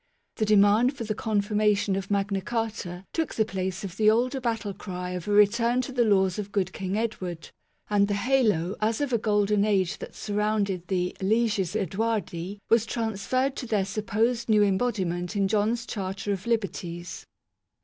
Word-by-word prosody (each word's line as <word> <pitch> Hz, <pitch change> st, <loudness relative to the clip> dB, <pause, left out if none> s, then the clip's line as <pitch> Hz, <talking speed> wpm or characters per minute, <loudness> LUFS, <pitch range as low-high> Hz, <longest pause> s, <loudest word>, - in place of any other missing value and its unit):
The 215 Hz, -, +1 dB
demand 215 Hz, +6 st, +4 dB
for 235 Hz, -, -4 dB
the 215 Hz, -1 st, -2 dB
confirmation 210 Hz, -2 st, +1 dB
of 195 Hz, 0 st, -4 dB
Magna 200 Hz, -1 st, 0 dB
Carta 210 Hz, -5 st, -4 dB
took 325 Hz, -2 st, -2 dB
the 220 Hz, -, +2 dB
place 190 Hz, -2 st, -3 dB
of 190 Hz, -4 st, -6 dB
the 215 Hz, -1 st, +5 dB
older 250 Hz, +4 st, +1 dB
battle 225 Hz, -4 st, -2 dB
cry 180 Hz, -2 st, -6 dB
of 180 Hz, 0 st, -5 dB
a -, -, -1 dB
return 230 Hz, +4 st, +4 dB
to 255 Hz, -, -6 dB
the 250 Hz, -2 st, +2 dB
laws 190 Hz, -3 st, +2 dB
of 205 Hz, -1 st, -5 dB
good 200 Hz, -2 st, -1 dB
King 190 Hz, +1 st, -3 dB
Edward, 185 Hz, -7 st, -4 dB, 0.4 s
and 205 Hz, -1 st, +3 dB
the 205 Hz, -, 0 dB
halo 210 Hz, -6 st, +1 dB
as 220 Hz, +1 st, +1 dB
of 285 Hz, -3 st, -1 dB
a 235 Hz, -, +3 dB
golden 210 Hz, -1 st, +2 dB
age 195 Hz, -3 st, +1 dB
that -, -, -8 dB
surrounded 205 Hz, -3 st, -1 dB
the 180 Hz, -2 st, -1 dB
" -, -, -17 dB
leges 210 Hz, -2 st, +1 dB
Eadwardi 200 Hz, -2 st, -2 dB
" -, -, -50 dB
was 230 Hz, -1 st, +4 dB
transferred 235 Hz, +5 st, -1 dB
to 250 Hz, -, -5 dB
their 210 Hz, -4 st, +1 dB
supposed 220 Hz, +4 st, -1 dB
new 210 Hz, -1 st, +5 dB
embodiment 190 Hz, -3 st, 0 dB
in 200 Hz, -1 st, +2 dB
John's 220 Hz, +3 st, 0 dB
Charter 200 Hz, -2 st, -3 dB
of 195 Hz, +3 st, -6 dB
Liberties. 185 Hz, -6 st, -3 dB
205 Hz, 180 wpm, -26 LUFS, 190-225 Hz, 0.4 s, the